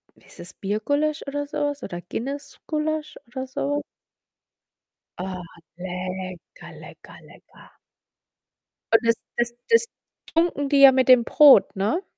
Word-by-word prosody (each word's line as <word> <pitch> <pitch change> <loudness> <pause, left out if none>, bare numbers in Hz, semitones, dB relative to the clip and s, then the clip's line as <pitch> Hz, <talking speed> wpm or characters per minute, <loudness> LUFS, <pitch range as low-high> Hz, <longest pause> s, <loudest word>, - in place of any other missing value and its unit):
wie - - -25
ist - - -17
das 180 - -10
Biergulasch 285 +10 -1
oder 290 +1 -3
so 295 +1 -7
was 290 -1 -2
oder 175 -2 -6
Guinness 275 +9 -6
Gulasch 310 0 -3
oder 260 +2 -6
so? 285 +2 -3 1.4
Oh, 185 0 -5 0.4
lecker, 185 - -7
lecker, - - -14
lecker. - - -19 1.2
Und 225 - +7
das 230 - +4 0.2
das 235 0 0 0.2
das 460 0 +4 0.5
tunken 330 -4 +1
die 280 -1 +3
ja 275 - +10
mit 260 0 +1
dem 250 -2 +7
Brot, 290 -1 +6
ne? 210 - -1
265 Hz, 135 wpm, -23 LUFS, 200-290 Hz, 1.4 s, ja